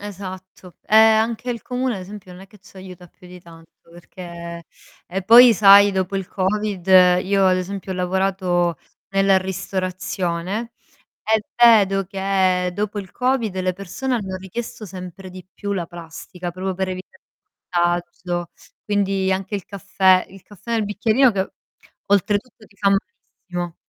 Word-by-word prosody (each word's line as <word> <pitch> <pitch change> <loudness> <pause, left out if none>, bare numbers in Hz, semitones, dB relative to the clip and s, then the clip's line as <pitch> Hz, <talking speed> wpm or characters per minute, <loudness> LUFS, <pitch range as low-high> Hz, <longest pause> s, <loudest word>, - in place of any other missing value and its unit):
esatto. 185 -2 -9
Ehm, 220 0 +6
anche 230 +2 -2
il 235 -1 -4
comune 250 -1 -2
ad - - -7
esempio 190 -1 -10
non 180 - -12
è - - -14
che 210 +2 -20
ci 195 0 -20
aiuta 185 -1 -11
più 180 - -19
di 180 0 -12
tanto, 165 -1 -16 0.2
perché 170 -1 -10 0.4
e 190 +2 -4
poi, 235 +5 +8
sai, 200 -1 +7
dopo 190 +1 -2
il 195 -2 -4
Covid 195 -1 -2 0.4
io 195 0 +1
ad 185 -1 +3
esempio 190 +1 -5
ho - - -5
lavorato 180 -2 0 0.3
nella 195 0 +3
ristorazione 185 +2 -4 0.5
e 220 -1 +2
vedo 205 -5 +5
che 190 -1 0
dopo 205 +1 -3
il 190 -2 -7
Covid 250 -6 -1
le 185 0 0
persone 200 +8 -4
hanno 190 -5 -3
richiesto 215 +4 -7
sempre 185 0 -9
di 185 0 -11
più 200 -1 -4
la 180 -4 -3
plastica, 175 +1 -8
proprio 185 +2 -4
per 190 +1 -2
evitare 185 +9 -9 0.5
disagio. 175 0 -2 0.3
Quindi 195 -2 0
anche 195 +2 -3
il 195 - -4
caffè 190 -2 +2
il 195 0 -15
caffè 205 +4 -9
nel 225 -2 +1
bicchierino 220 +5 +2
che 195 -1 -2 0.6
oltretutto 205 +3 0
ti 200 - -26
fa 200 0 +2
malissimo. 180 -2 -4
190 Hz, 155 wpm, -21 LUFS, 180-205 Hz, 0.6 s, poi